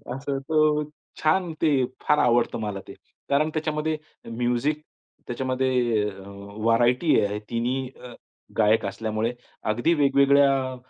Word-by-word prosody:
असं 135 0 -3
तो 150 +1 +2 0.4
छान 170 +2 +2
ते 155 -2 +3 0.3
फार 150 - +2
आवडतं 120 -1 +2
मला 105 -2 -4
ते. - - -9 0.4
कारण 150 +3 +2
त्याच्यामध्ये 155 0 -1 0.3
म्युझिक 125 +6 0 0.5
त्याच्यामध्ये 130 -2 0
अ, 95 -1 -11 0.3
व्हरायटी 120 +7 +3
आहे. 105 +1 -3
तिन्ही 125 +2 -2
अ, 125 - -9 0.4
गायक 110 0 +3
असल्यामुळे. 110 +3 -2 0.4
अगदी 120 +10 +1
वेगवेगळ्या 140 -2 +3
130 Hz, 115 wpm, -25 LUFS, 115-150 Hz, 0.5 s, ते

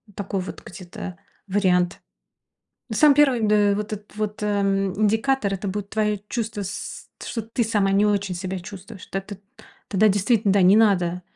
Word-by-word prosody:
такой 200 -1 -3
вот 180 - -8
где-то 180 0 -8 0.3
вариант. 185 -3 +1 0.9
Ну, 220 - -2
самый 295 +5 +6
1, 270 -4 +4
д 210 - +3 0.2
э, - - +1
вот 210 +1 -4
этот 210 -1 -8
вот, 210 0 -3
эм, 195 -2 +1
индикатор 220 0 +1
это 195 +1 -5
будет 200 +1 -4
твое 210 -2 0
чувство 220 -4 -3
с 195 +1 -6 0.2
что 230 - -3
ты 225 +2 -2
сама 205 -3 +1
не 200 +1 +4
очень 200 -2 0
себя 185 +1 -4
чувствуешь. 195 +2 -11
Тет 195 +1 -5
эт 195 - -9 0.5
Тогда 210 +2 +3
действительно, 205 +1 +2
да, 200 - +3
не 190 +3 +6
надо, 180 -5 +2
205 Hz, 175 wpm, -23 LUFS, 190-215 Hz, 0.9 s, самый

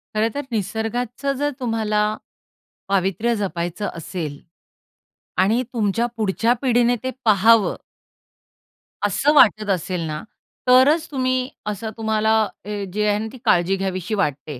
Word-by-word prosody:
खरंतर 225 +6 0
निसर्गाचं 230 +5 -2
जर 290 +1 0
तुम्हाला 220 -3 0 0.9
पावित्र्य 195 +4 +1
जपायचं 180 0 -3
असेल 160 -3 -5 1.0
आणि 225 +6 +2
तुमच्या 225 0 +1
पुढच्या 225 +2 +1
पिढीने 245 -1 +3
ते 260 - -1 0.2
पाहावं 220 +1 +5 1.3
असं 240 +9 +2
वाटत 215 -5 +5
असेल 180 -1 -1
ना, 150 0 -4 0.5
तरच 265 +6 +5
तुम्ही 255 -1 0 0.2
असं 210 +1 -3
तुम्हाला 220 0 +1 0.3
हे 205 -1 -4
जे 210 0 0
आहे 205 - +2
ना 220 - -3
ती 260 - -11
काळजी 175 +2 +3
घ्यावीशी 190 +1 -3
वाटते. 145 -7 -2
215 Hz, 120 wpm, -21 LUFS, 195-240 Hz, 1.3 s, पाहावं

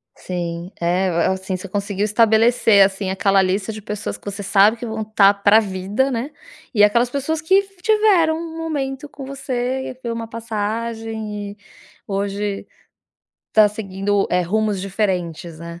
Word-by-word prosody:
Sim. 175 0 -5
É, 180 +2 +1
a 170 +2 +1
assim, 190 0 -3
você 195 - -8
conseguiu 200 +1 -2
estabelecer 220 -1 +4
assim, 195 0 -3
aquela 195 0 +3
lista 195 +3 -1
de 215 - -8
pessoas 210 +1 -5
que - - -26
você 200 0 -5
sabe 200 +3 +4
que 240 - -6
vão 220 -1 -3
tá 210 -2 +4
pra 205 +2 +5
vida, 205 +6 -1
né, 245 +4 -2 0.4
e 205 -2 +4
aquelas 235 +4 +4
pessoas 295 +4 -2
que 380 +5 +4 0.2
tiveram 395 -7 +3
um 330 -1 -7
momento 290 -3 -3
com 275 -2 -9
você, 260 -1 -3
foi 235 - -2
uma 230 0 -4
passagem 220 -1 -4
e 205 - -14 0.5
hoje 200 0 -3 0.9
tá 215 -1 +6
seguindo, 200 -1 -1
eh, 180 - +2
rumos 205 +2 0
diferentes, 180 -5 -2
né. 170 0 -9
210 Hz, 155 wpm, -20 LUFS, 195-235 Hz, 0.9 s, tá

